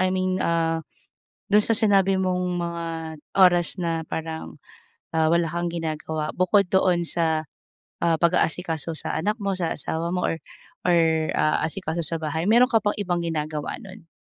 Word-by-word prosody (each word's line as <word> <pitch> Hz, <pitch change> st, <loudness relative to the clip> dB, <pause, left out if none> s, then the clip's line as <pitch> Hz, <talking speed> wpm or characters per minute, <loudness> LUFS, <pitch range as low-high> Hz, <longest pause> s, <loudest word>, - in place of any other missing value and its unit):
I 185 Hz, -, +3 dB
mean, 185 Hz, 0 st, 0 dB
ah, 165 Hz, -1 st, +1 dB, 0.7 s
dun 210 Hz, +1 st, +5 dB
sa 230 Hz, -, +2 dB
sinabi 195 Hz, -3 st, +3 dB
mong 180 Hz, -1 st, 0 dB
mga 170 Hz, -1 st, -3 dB, 0.5 s
oras 180 Hz, 0 st, +4 dB
na 165 Hz, -2 st, -1 dB
parang, 160 Hz, -, -5 dB, 0.6 s
ah, 160 Hz, 0 st, +3 dB
wala 170 Hz, -1 st, +2 dB
kang 170 Hz, +1 st, -2 dB
ginagawa, 155 Hz, -2 st, -3 dB
bukod 185 Hz, +1 st, +3 dB
doon 180 Hz, -2 st, +2 dB
sa, 160 Hz, -2 st, 0 dB, 0.6 s
ah, 165 Hz, -1 st, +3 dB
pag-aasikaso 170 Hz, -2 st, 0 dB
sa -, -, -3 dB
anak 205 Hz, +7 st, 0 dB
mo, 200 Hz, -1 st, -1 dB
sa 170 Hz, -3 st, -1 dB
asawa 165 Hz, +3 st, -3 dB
mo, 180 Hz, -, 0 dB
or, -, -, -1 dB, 0.5 s
or 175 Hz, -1 st, +5 dB, 0.4 s
ah, 155 Hz, -, +2 dB
asikaso 165 Hz, -1 st, -3 dB
sa 165 Hz, +2 st, -1 dB
bahay, 160 Hz, +1 st, -2 dB
meron 240 Hz, +3 st, +6 dB
ka -, -, +5 dB
pang 205 Hz, -, 0 dB
ibang 175 Hz, -3 st, -1 dB
ginagawa 155 Hz, -2 st, -3 dB
nun? 195 Hz, -3 st, -12 dB
170 Hz, 160 wpm, -24 LUFS, 160-185 Hz, 0.7 s, meron